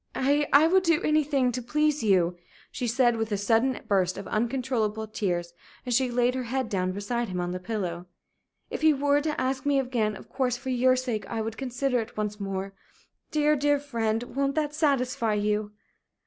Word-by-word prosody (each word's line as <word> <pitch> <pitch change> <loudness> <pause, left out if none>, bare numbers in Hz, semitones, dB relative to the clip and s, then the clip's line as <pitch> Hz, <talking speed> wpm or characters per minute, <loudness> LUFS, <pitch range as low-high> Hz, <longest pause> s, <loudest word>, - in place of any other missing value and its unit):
"I 285 +2 +2
I 285 +3 +7
would 375 +3 +4
do 335 -3 +3
anything 290 -4 +2
to 250 +1 -3
please 300 +4 +1
you!" 185 -5 +2 0.4
she 245 - -3
said, 240 0 +3
with 225 0 -2
a 205 - +1
sudden 225 +6 +2
burst 185 -3 +1
of 200 - -7
uncontrollable 230 -2 -1
tears, 175 -5 -2 0.3
as 250 - -1
she 255 +1 +2
laid 245 +1 +2
her 255 -1 -3
head 255 0 -2
down 185 -2 0
beside 215 +4 -2
him 180 -1 -3
on 175 0 -2
the 180 - -4
pillow. 180 -3 -4 0.6
"If - - -4
he 310 -1 +5
were 285 +1 +2
to 305 0 -2
ask 265 +1 -1
me 285 -1 +2
again, 235 -5 -1
of - - -12
course, 255 -2 -1
for 265 +1 -6
your 255 +1 +4
sake, 250 -4 -3
I 230 - -3
would 220 0 -4
consider 250 0 -1
it 225 0 -6
once 210 0 -3
more. 195 0 -4 0.6
Dear, 300 0 +2
dear 290 0 +2
friend, 230 -5 -1
won't 275 0 0
that 300 -1 0
satisfy 255 -7 +1
you?" 210 0 0
245 Hz, 195 wpm, -27 LUFS, 210-275 Hz, 0.6 s, I